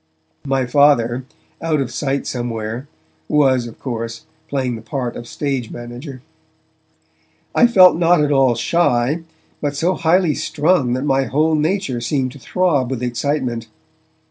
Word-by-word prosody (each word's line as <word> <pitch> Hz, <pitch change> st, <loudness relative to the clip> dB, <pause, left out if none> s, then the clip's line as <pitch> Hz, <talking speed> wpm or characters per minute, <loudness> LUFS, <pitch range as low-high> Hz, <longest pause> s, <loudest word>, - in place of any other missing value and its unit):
My 135 Hz, -1 st, +1 dB
Father, 125 Hz, -2 st, +3 dB, 0.4 s
out 160 Hz, -2 st, 0 dB
of 130 Hz, -3 st, -2 dB
sight 140 Hz, 0 st, -1 dB
somewhere, 120 Hz, +1 st, -4 dB, 0.4 s
was, 130 Hz, -5 st, +2 dB
of 115 Hz, -, -11 dB
course, 115 Hz, +3 st, -5 dB, 0.2 s
playing 130 Hz, -4 st, -1 dB
the 110 Hz, -, -8 dB
part 120 Hz, +2 st, -4 dB
of 120 Hz, -, -8 dB
stage 135 Hz, -3 st, -3 dB
manager. 125 Hz, +2 st, -9 dB, 1.3 s
I 240 Hz, -, +5 dB
felt 185 Hz, -6 st, +7 dB
not 175 Hz, 0 st, +4 dB
at 145 Hz, -, +1 dB
all 135 Hz, -3 st, +4 dB
shy, 140 Hz, +1 st, +1 dB, 0.4 s
but 145 Hz, -1 st, -2 dB
so 170 Hz, +6 st, +1 dB
highly 170 Hz, -1 st, +2 dB
strung 155 Hz, -4 st, +1 dB
that 130 Hz, +2 st, -2 dB
my 135 Hz, -1 st, +2 dB
whole 155 Hz, +6 st, +1 dB
nature 155 Hz, -5 st, 0 dB
seemed 130 Hz, +1 st, -1 dB
to 140 Hz, -, -13 dB
throb 145 Hz, -3 st, 0 dB
with 130 Hz, -2 st, -3 dB
excitement. 125 Hz, -2 st, -2 dB
135 Hz, 145 wpm, -19 LUFS, 120-155 Hz, 1.3 s, felt